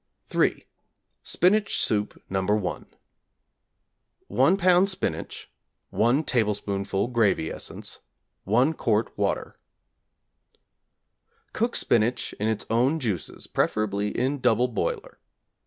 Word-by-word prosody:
Spinach 205 +4 +2
Soup 105 -1 -1
No. 95 0 -1
1= 105 -1 -1 1.4
1 140 +10 +3
lb. 185 0 +4
Spinach, 190 - -4 0.4
1 120 +7 +2
tablespoonful 105 -4 -1
gravy 105 -9 +1
essence, - - -5 0.5
1 125 +10 +3
quart 110 -6 0
water. - - -2 1.9
Cook 235 +2 0
spinach 120 +2 +1
in 105 - 0
its 110 -1 -1
own 130 +8 +2
juices 105 - -4
(preferably 105 -1 0
in 135 +6 -1
double 125 0 +2
boiler). 110 - -3
115 Hz, 90 wpm, -26 LUFS, 105-140 Hz, 1.9 s, lb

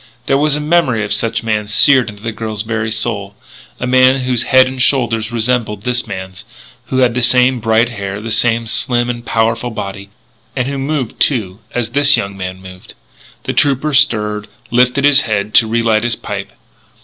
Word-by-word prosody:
There 135 - +1
was 150 0 +2
a - - -2
memory 150 -8 +1
of 105 - +2
such 115 +2 -1
a - - -12
man 105 -2 -1
seared 125 +3 +4
into 105 0 -13
the 115 - -3
girl's 110 -1 -4
very 115 -1 -3
soul; 110 -3 -3 0.4
a - - -3
man 130 +1 +3
whose 125 -2 0
head 130 -1 +6
and 130 0 -4
shoulders 115 -5 +1
resembled 115 -3 -1
this 125 0 -1
man's, 95 0 -7 0.4
who 130 - -3
had 125 -3 +2
the 125 - -1
same 125 +1 +3
bright 115 +1 +1
hair, 100 -3 -6
the 110 +1 -6
same 115 +1 +2
slim 120 +2 0
and 120 -1 -8
powerful 115 +1 -1
body, 100 -3 -7 0.5
and 130 -2 -1
who 140 0 -4
moved, 135 -3 -3
too, 105 -8 0 0.2
as 120 -2 -2
this 145 +2 +4
young 100 0 -4
man 95 -1 -6
moved. 90 -1 -13 0.5
The - - -3
trooper 145 +2 +1
stirred, 105 -6 +1 0.2
lifted 125 +3 +2
his 145 -1 +6
head 105 -1 -3
to 115 - +6
relight 115 -1 +1
his 120 -2 0
pipe. - - -7
115 Hz, 190 wpm, -15 LUFS, 105-130 Hz, 0.5 s, head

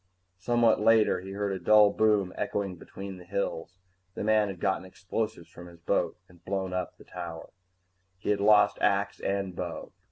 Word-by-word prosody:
Somewhat 120 +2 +3
later, 110 -3 +4
he 95 +1 -8
heard 100 0 -2
a 95 - -3
dull 105 +1 +6
boom 105 -4 +2
echoing 100 -3 -2
between 95 +2 -9
the - - -12
hills. 90 -1 -4 0.4
The - - -4
man 110 0 +3
had 95 -3 -6
gotten 95 +1 0
explosives 95 0 -4
from 85 +1 -11
his 85 -1 -14
boat 85 - 0
and 90 -1 -21
blown 95 -1 -3
up 90 -1 -3
the - - -15
tower. 85 -1 -8 0.7
He 95 - -2
had 105 - +1
lost 105 0 +5
axe 100 0 +1
and 100 -2 -2
bow. - - -5
100 Hz, 180 wpm, -28 LUFS, 90-105 Hz, 0.7 s, dull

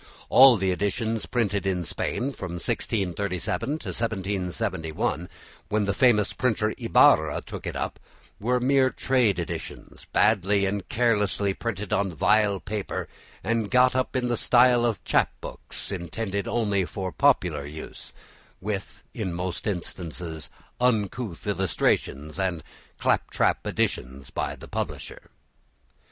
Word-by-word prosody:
All 130 -2 +8
the 95 -1 +1
editions 110 +4 -1
printed 105 -5 0
in 90 -2 0
Spain 125 - -2
from 95 -9 -6
1637 90 -1 -2
to - - -7
1771, 90 -6 -2 0.4
when 105 -1 +1
the 100 - 0
famous 105 -2 +3
printer 110 -3 0
Ibarra - - +4
took - - -8
it - - -4
up, - - -3 0.4
were 125 +4 +1
mere 130 +1 +3
trade 125 -7 +2
editions, 85 - -6
badly 100 -1 +3
and 100 -1 -3
carelessly 105 -4 +1
printed 105 -2 -4
on 100 0 +1
vile 100 +5 +3
paper 105 +1 -4 0.4
and 115 0 0
got 125 0 +4
up 130 0 0
in 125 -1 +1
the 120 - +1
style 120 0 +5
of 115 - -2
chap - - +3
books - - -6
intended 100 +3 -3
only 105 -5 +1
for 95 +1 -4
popular 90 - +2
use, 75 +2 -9 0.5
with, 100 0 -5
in 105 -6 -3
most 90 +3 -3
instances, 85 -4 -4 0.3
uncouth 115 -4 0
illustrations 85 -5 0
and 90 -4 -1 0.3
clap - - +1
trap - - +1
additions 65 +1 -2
by - - -2
the - - -12
publisher. - - -5
100 Hz, 130 wpm, -26 LUFS, 90-115 Hz, 0.5 s, All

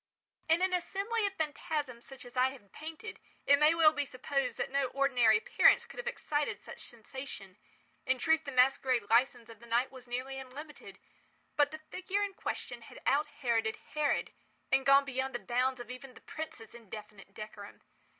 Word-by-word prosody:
In 330 +3 +4
an 375 0 +2
assembly 400 +5 0
of 395 - -4
phantasms 300 -6 -3
such 265 -2 -10
as 245 - -12
I 255 +1 +4
have 240 -7 -13
painted, 320 +8 -8 0.3
it 280 0 +6
may 305 +2 +6
well 315 -2 +6
be 290 -1 0
supposed 275 +1 -2
that - - -2
no 275 -1 +2
ordinary 250 -5 +4
appearance 210 - +5
could - - -11
have 485 - -5
excited 300 -11 -1
such - - -11
sensation. 230 -5 -8 0.5
In 260 0 +3
truth 320 +4 +3
the 280 - -5
masquerade 255 -4 +3
licence 235 -1 +3
of 230 -2 -12
the 235 - -14
night 240 +3 +1
was 255 -2 -12
nearly 255 +2 -4
unlimited; 285 +4 -10 0.6
but 290 -1 +4
the 310 - -7
figure 370 +5 -2
in 400 -1 -2
question 245 -9 -5
had 230 - -12
out 285 +3 +3
Heroded 225 -3 +1 0.2
Herod, 300 -1 +1 0.4
and 265 +1 +3
gone 275 0 +7
beyond 265 -1 -2
the - - -1
bounds 250 +2 0
of 240 0 -7
even 255 0 -9
the - - -14
prince's 280 -8 -7
indefinite 210 -3 -11
decorum. 215 -1 -9
265 Hz, 180 wpm, -32 LUFS, 240-300 Hz, 0.6 s, gone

